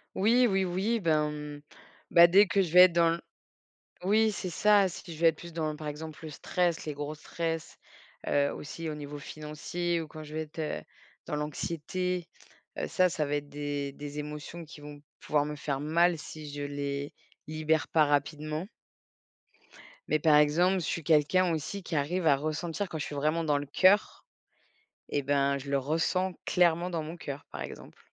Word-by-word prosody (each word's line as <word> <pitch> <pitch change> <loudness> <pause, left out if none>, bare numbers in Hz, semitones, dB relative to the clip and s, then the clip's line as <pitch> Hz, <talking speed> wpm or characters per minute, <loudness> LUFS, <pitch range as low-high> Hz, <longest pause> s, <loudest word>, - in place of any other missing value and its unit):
Oui, 235 +5 +4
oui, 195 -2 +1
oui. 195 +6 0
Ben, 155 -4 +2
mmh, 150 -1 -7 0.5
bah, 170 0 +8
dès 195 +4 +6
que 195 +1 +2
je 170 - -5
vais 180 - +10
être 180 -1 +8
dans 170 -1 +4
l 170 - -5 0.8
oui, 215 +3 +3
c'est 190 - -4
ça, 205 +3 +4
si 170 -1 -9
je 155 - -11
vais 170 - +7
être 160 - 0
plus 170 0 -10
dans, 155 -2 -2
par 155 0 -8
exemple, 155 +2 -7
le 155 - -6
stress, 170 +2 -1
les 150 - -3
gros 145 +1 -4
stress, 165 +1 -4 0.5
heu, 140 0 +2
aussi 160 +2 -6
au 155 - -3
niveau 145 0 -7
financier 155 +4 -3
ou 160 - -6
quand 155 +1 -9
je 150 0 -10
vais 155 - -1
être, 155 +1 -12
heu, 155 -1 -3 0.4
dans 150 - -2
l'anxiété, 170 +4 -3 0.5
heu, - - -2
ça 185 0 +3
ça 160 -4 -1
va 145 - -1
être 145 0 -5
des 145 -1 -3
des 145 +1 -7
émotions 150 +3 -6
qui 155 -1 -13
vont 145 0 -10 0.2
pouvoir 150 -1 +1
me 150 0 -4
faire 140 -2 -3
mal 170 +4 +3
si 150 0 -8
je 145 0 -5
les 145 0 -3 0.3
libère 155 -2 0
pas 155 -2 +4
rapidement 150 +3 -1 1.4
mais 155 - +3
par 150 0 +5
exemple, 175 +6 +4
je - - -3
suis 165 - -2
quelqu'un 165 +4 +3
aussi 160 +6 -4
qui 165 - -4
arrive 165 +5 0
à 145 -3 +6
ressentir. 160 +6 -3
Quand 160 - -4
je 150 - -3
suis - - -7
vraiment 155 +4 +1
dans 145 -2 +2
le 145 - -6
cœur 190 +8 +3 0.8
et 145 - -1
ben, 140 0 +2
je 140 +1 -9
le 140 0 +2
ressens 165 +6 0
clairement 175 0 +2
dans 165 -2 -2
mon 160 +3 -7
cœur 145 -4 -7
par 75 - -7
exemple. 70 - -10
155 Hz, 195 wpm, -29 LUFS, 145-175 Hz, 1.4 s, vais